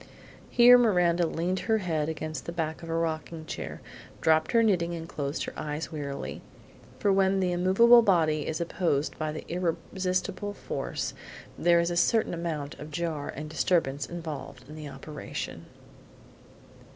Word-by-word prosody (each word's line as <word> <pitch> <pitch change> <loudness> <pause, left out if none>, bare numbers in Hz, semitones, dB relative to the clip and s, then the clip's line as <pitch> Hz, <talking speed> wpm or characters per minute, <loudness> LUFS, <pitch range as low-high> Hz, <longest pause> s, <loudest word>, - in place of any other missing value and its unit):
Here 245 +1 +8
Miranda 180 -6 +3
leaned 180 +4 -1
her 220 -1 +1
head 160 -6 -1
against 155 -2 -5
the - - -2
back 160 -2 -3
of 165 - -8
her 165 0 -1
rocking 160 0 -3
chair, - - -6 0.4
dropped 160 0 +3
her 230 -1 +4
knitting 175 -5 +2
and 165 -1 -6
closed 145 -2 -3
her - - -5
eyes 150 +2 -4
wearily, 140 -3 -5 0.6
for 200 - +2
when 195 0 +3
the 185 -1 +1
immovable 195 +7 +6
body 160 -8 +2
is 160 - -2
opposed 165 -4 0
by 155 -1 -1
the 155 - -7
irresistible 185 +3 -2
force - - -4 0.4
there 170 0 +4
is 170 +1 +1
a - - -1
certain 225 +3 +3
amount 160 -4 -4
of 150 - -8
jar 155 -2 -3
and 150 +2 -6
disturbance 150 -3 0
involved 145 -6 -7
in 150 - -10
the 155 -2 -7
operation. 150 +1 -7
165 Hz, 155 wpm, -28 LUFS, 155-185 Hz, 0.6 s, Here